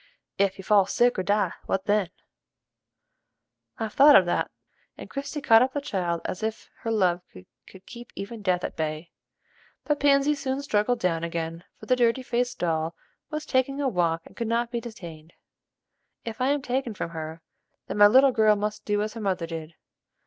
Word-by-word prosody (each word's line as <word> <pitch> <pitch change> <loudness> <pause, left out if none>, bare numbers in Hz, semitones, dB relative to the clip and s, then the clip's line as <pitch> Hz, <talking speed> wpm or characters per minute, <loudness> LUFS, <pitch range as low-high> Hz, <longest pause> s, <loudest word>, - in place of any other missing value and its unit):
"Ef 195 -1 +2
you 190 - -9
fall 200 -1 +4
sick 245 -3 +2
or - - +2
die, 200 -1 +1
what 190 0 -1
then?" 205 -3 +1 1.7
"I've 220 -2 -4
thought 285 +1 +8
of 185 - +7
that," 175 - 0 0.5
and - - -9
Christie 280 +1 -5
caught 225 -3 +6
up 260 +1 +1
the 285 - -1
child 180 -10 -2
as 185 - -4
if 220 0 -4
her 230 - -4
love 185 -5 +2 0.5
could 190 0 -15
keep 240 0 -11
even 210 +3 -7
death 180 -3 0
at - - -4
bay. 155 +1 -4 0.7
But 295 -1 0
Pansy 280 +1 +4
soon 280 -1 -3
struggled 230 -1 +1
down 170 -5 0
again, 165 0 -4
for - - -11
the 255 - +3
dirty 245 +1 +2
faced 245 0 -1
doll 165 -1 -1 0.3
was 305 0 -4
taking 275 0 0
a 285 - +1
walk 170 -7 0
and - - -16
could 235 - -3
not 235 +1 0
be 235 -1 -2
detained. 170 -9 -10 0.9
"If 230 +1 -6
I 255 - +2
am 285 0 +1
taken 250 -3 -2
from 170 - -4
her, 160 0 -7 0.4
then - - -5
my 205 - +9
little 265 +5 +6
girl 220 -3 +4
must 210 +1 -3
do 210 0 +1
as 215 - -4
her 225 - -7
mother 190 -4 -1
did. 165 -1 -7
210 Hz, 190 wpm, -26 LUFS, 175-250 Hz, 1.7 s, my